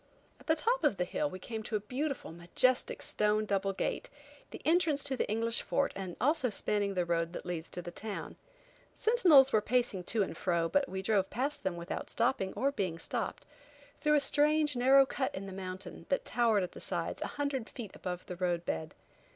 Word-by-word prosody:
At - - -19
the 320 - +4
top 475 +10 +1
of 200 - +3
the 180 - +1
hill 295 +10 -1
we 185 - -7
came 220 +4 -6
to 215 - -4
a - - +2
beautiful, 260 - -3
majestic, 175 +10 +1
stone 210 0 +1
double 195 -1 0
gate, 195 - -3 0.4
the - - -8
entrance 315 -3 +3
to 270 -2 0
the - - -2
English 230 +2 +1
fort 280 0 0
and 190 -3 -6
also 290 +1 +2
spanning 205 -1 0
the 180 -1 +1
road 170 0 0
that - - -6
leads 175 -2 -4
to 180 - -4
the 175 - -6
town. 210 +3 -6 0.6
Sentinels 340 - +5
were 215 - +5
pacing 235 -5 0
to 215 +1 +2
and - - -5
fro 170 -2 0
but 285 +11 +1
we 190 0 -4
drove 195 -2 +2
past 275 +6 -2
them 180 -2 -2
without 170 +2 -5
stopping 230 -5 +1
or 275 +1 +1
being 185 -10 -2
stopped, - - -4 0.5
through 300 -1 +3
a - - +5
strange, 295 +1 +3
narrow 265 +2 +6
cut 265 0 -2
in 190 - -5
the 195 - -7
mountain, 185 0 -7
that - - 0
towered 225 -5 +2
at 180 - -4
the - - -10
sides - - 0
a - - -1
hundred 280 -5 -2
feet 220 -6 -8
above 180 -1 -5
the 180 - -7
road 175 -2 -1
bed. 80 0 -3
215 Hz, 210 wpm, -32 LUFS, 185-275 Hz, 0.6 s, narrow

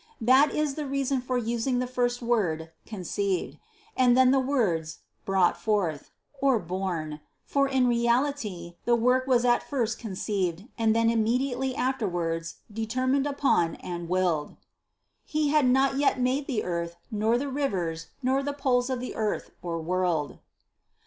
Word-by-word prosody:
That 260 +5 +5
is 300 -2 0
the 295 0 -4
reason 275 -1 0
for 255 0 -1
using 240 +2 0
first 245 -1 -1
the - - -6
word 165 -9 0 0.2
"conceived" 195 -2 -2 0.4
and 250 -1 +4
then 260 -1 +6
the 270 - +4
words 200 - 0 0.2
"brought 190 -2 +2
forth," 185 -9 -1 0.3
or 270 -3 +4
born; 175 -5 -3 0.3
for 275 -1 +2
in 265 -2 +2
reality 235 -7 0
the 240 - +4
work 250 +3 +2
was 250 -2 +3
at 240 -1 +4
first 235 -5 -2
conceived 195 -3 -2
and 225 -1 +2
then 230 0 +3
immediately 250 +3 0
afterwards 175 - -1 0.2
determined 255 +5 0
upon 270 - +1
and 175 -1 -6
willed. 180 -5 0 0.7
63. 310 - -1
"He 295 - +2
had 300 -3 +4
not 270 +1 +3
yet 280 -2 +2
made 260 +3 0
the 240 -7 -1
earth, 170 -1 -3 0.2
nor 220 +2 +2
the 280 +3 -2
rivers, 180 - -2 0.2
nor 265 +2 +2
the 285 +1 -3
poles 260 -3 +1
of 260 -2 -1
the 250 - -5
(earth) 215 -1 -2
world." 170 -3 -1
235 Hz, 150 wpm, -27 LUFS, 180-260 Hz, 0.7 s, then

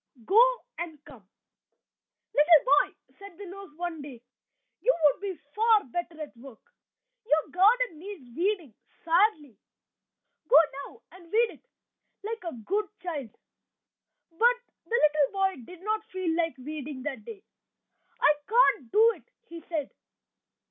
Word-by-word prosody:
"GO" 425 +4 +6 0.4
AND 320 -4 -7
"COME" 240 -10 -15 1.1
"Little 300 +1 +6 0.2
boy," - - -28 0.2
said 400 -4 -12
the 410 - -9
nurse 390 +1 -10
one 345 -2 -5
day, 280 -4 -10 0.6
"you - - +3
would 295 +4 +4
be 385 -5 -5
far 440 0 +4
better 330 +4 -5
at 300 -4 -8
work. 245 -2 -13 0.6
Your 315 -7 +1
garden 400 -1 +3
needs 325 - -10
weeding 355 - -1 0.3
sadly; 330 - +2 0.9
go - - +4 0.3
now 455 - -18
and 365 -1 -15
weed 455 +1 +3
it, - - -18 0.6
like 445 -1 -5
a 335 - -4
good 415 +2 0 0.2
child!" 295 -9 -4 1.0
But 470 +9 +3 0.3
the - - -29
little 300 - +3
boy 385 -7 0
did 360 +4 -13
not 430 +1 -1
feel 370 -3 -2
like 330 -3 -1
weeding 285 0 -7
that 265 -7 -5
day. 400 - -10 0.8
"I 295 - +5
can't 445 - +3
do 450 +2 +6
it," - - -25 0.2
he 335 0 -9
said. 310 -5 -3
345 Hz, 140 wpm, -28 LUFS, 295-410 Hz, 1.1 s, GO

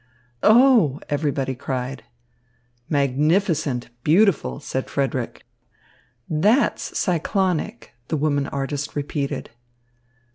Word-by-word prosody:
"Oh!" 220 - +5
everybody 140 -2 -1
cried. 130 +1 -4 0.9
"Magnificent, 145 -1 +1
beautiful," 160 - +3
said 130 - -4
Frederick. 130 -3 -2 0.8
"That's 205 - +1
cyclonic," 180 - -1
the 160 - -1
woman 145 -1 0
artist 140 +1 -4
repeated. 140 -2 -3
145 Hz, 75 wpm, -22 LUFS, 135-170 Hz, 0.9 s, Oh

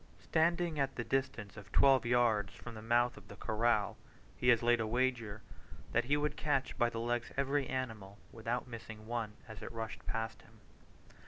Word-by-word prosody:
Standing 170 -1 +2
at 135 -1 0
the 120 - -2
distance 115 -5 -1
of 105 0 -11
twelve 135 -1 +5
yards 115 -5 +3
from 120 - -9
the 110 - -8
mouth 120 +2 +2
of - - -13
the 100 - -10
corral, 110 0 +1 0.4
he 125 - -2
has 120 -2 +6
laid 120 0 +4
a 110 - 0
wager 115 -3 0 0.5
that - - +2
he 145 +3 +3
would 150 0 0
catch 140 -3 0
by 120 - +3
the 115 - -4
legs 120 0 -1
every 140 0 +1
animal, 110 -7 -4
without 115 +2 -2
missing 110 -2 -8
one, 115 -2 -2
as 110 -2 -9
it 110 - -6
rushed 115 -1 -5
past 110 0 -2
him. 110 0 -20
120 Hz, 185 wpm, -34 LUFS, 110-130 Hz, 0.5 s, has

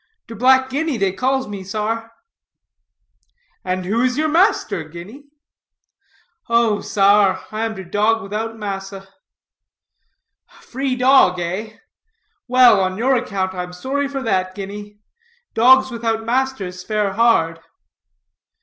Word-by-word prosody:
"Der - - -10
Black 260 +3 +3
Guinea 295 -1 -1
dey 195 -2 +1
calls 260 +4 -1
me, 200 -2 -7
sar." 220 +3 -4 1.5
"And 185 0 -3
who 220 +5 0
is 255 0 0
your 310 +1 +1
master, 345 - +1
Guinea?" 175 - -12 1.2
"Oh 230 -3 +2
sar, 195 -1 +2
I 220 +1 -2
am 225 -1 -4
der 190 - -7
dog 210 +4 0
widout 220 +3 -5
massa." 195 -2 -6 1.4
"A - - -21
free 265 0 -3
dog, 250 -8 +4
eh? 200 +5 -5 0.7
Well, 250 -4 +6
on 185 0 -1
your 260 +4 +2
account, 195 -6 -2
I'm 180 -1 -6
sorry 275 +10 -2
for 275 -1 -5
that, 185 -4 -1
Guinea. 205 +1 -8 0.6
Dogs 260 +3 +5
without 225 -1 -2
masters 230 -7 -2
fare 210 -1 -1
hard." 200 -8 +2
220 Hz, 125 wpm, -19 LUFS, 195-255 Hz, 1.5 s, Well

